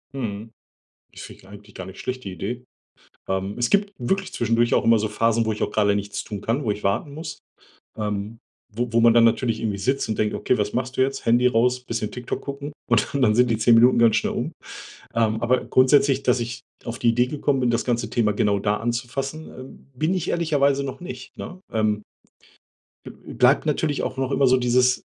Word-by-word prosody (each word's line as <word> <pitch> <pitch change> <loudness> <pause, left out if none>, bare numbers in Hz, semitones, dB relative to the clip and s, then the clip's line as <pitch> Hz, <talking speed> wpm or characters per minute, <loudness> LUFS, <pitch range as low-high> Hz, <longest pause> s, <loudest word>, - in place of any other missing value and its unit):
Mhm, 110 -3 -5 0.6
ich - - -10
finde - - -11
die - - -18
eigentlich 105 +1 -14
gar 95 - -7
nicht 95 0 -11
schlecht 130 0 -5
die 95 - -5
Idee. 105 +8 -5 0.7
Ähm, 95 +1 -2
es 120 - 0
gibt 200 0 +2
wirklich 190 +10 -2
zwischendurch 120 0 +1
auch - - +2
immer 115 0 +5
so 110 +1 -1
Phasen, 115 +1 +1
wo 110 - +1
ich 105 - -5
auch - - 0
gerade 100 -1 +2
nichts 100 0 -4
tun 105 -2 -6
kann, 115 +7 -1
wo 110 - 0
ich 105 0 -3
warten 115 +9 -1
muss 160 +3 -7 0.6
ähm, 105 +1 -3 0.4
wo 120 +3 -1
wo 115 - +4
man 115 0 +6
dann 115 0 +6
natürlich 115 0 +1
irgendwie 105 -3 -2
sitzt 130 +8 -1
und 110 - -2
denkt: 105 0 0
„Okay, 105 +5 0
was 105 0 -1
machst 130 +1 -3
du - - +1
jetzt?“ 135 +1 -1
Handy 120 +2 +4
raus, 125 +1 +2
bisschen 115 -3 -3
TikTok 125 +4 -5
gucken 140 +1 -6 0.2
und - - +2
dann 140 - -1
dann 105 -4 +4
sind 125 0 +3
die 110 - +1
10 115 +2 +5
Minuten 120 +2 +5
ganz 115 -2 +5
schnell - - 0
um. - - -3 0.6
Ähm, 110 -1 +1
aber 125 +2 +1
grundsätzlich, 135 +1 +3
dass 135 - +2
ich 120 0 -5 0.2
auf 115 0 -5
die 120 - +1
Idee 120 +2 +3
gekommen 140 -1 0
bin, 125 -1 +2
das 115 0 0
ganze 120 -1 -1
Thema 110 -3 +1
genau 100 -1 +1
da 105 +1 0
anzufassen, 130 +7 -4
ähm, 130 +1 -12
bin 155 +7 0
ich 180 -3 -2
ehrlicherweise 140 -5 +1
noch 135 +4 -6
nicht, 130 -7 -9
ne? 185 - -7
Ähm 110 -1 0 1.0
b - - -8 0.2
bleibt - - +3
natürlich 150 -1 0
auch - - -3
noch 135 0 -2
immer 135 -1 +3
so 130 - +5
dieses 125 0 +2
120 Hz, 220 wpm, -23 LUFS, 110-130 Hz, 1.0 s, man